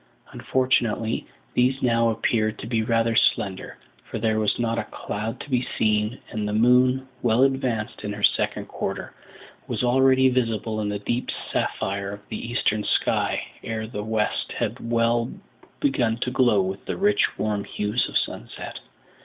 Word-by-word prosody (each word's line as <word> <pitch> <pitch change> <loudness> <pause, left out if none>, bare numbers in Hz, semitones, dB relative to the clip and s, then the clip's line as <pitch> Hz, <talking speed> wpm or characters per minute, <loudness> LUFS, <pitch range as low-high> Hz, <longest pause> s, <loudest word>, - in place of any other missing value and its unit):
Unfortunately, 120 -4 0 0.3
these 130 +2 +2
now 115 -1 +3
appeared 110 -1 0
to - - -7
be 115 0 0
rather 115 0 +1
slender; 95 -3 +1 0.3
for - - -3
there 110 0 +1
was 105 -1 +2
not 115 -1 0
a - - -3
cloud 110 +4 -5
to - - -8
be 125 -1 +3 0.2
seen, 105 +2 +1
and 105 -3 -2
the 105 - -2
moon, 125 +3 +4
well 120 +1 +3
advanced 130 -5 0
in 105 - -3
her 105 0 -6
second - - +2
quarter, - - -4 0.5
was - - -2
already 130 +1 +5
visible 115 -4 0
in 105 - -1
the 105 - -1
deep 120 +5 -2 0.2
sapphire 100 +1 -1
of 100 0 -11
the 115 - -5
eastern 105 -3 +1
sky - - +1 0.2
ere 110 -1 -3
the 105 -2 -5
west 110 -1 -1
had 115 - -3
well 115 0 +2 0.5
begun 120 -5 +1
to 125 +1 -2
glow 120 -7 +4
with 95 +1 -4
the - - -3
rich 205 +1 +2
warm 105 -2 -1
hues 105 +5 0
of - - +2
sunset. - - -4
115 Hz, 160 wpm, -24 LUFS, 105-125 Hz, 0.5 s, already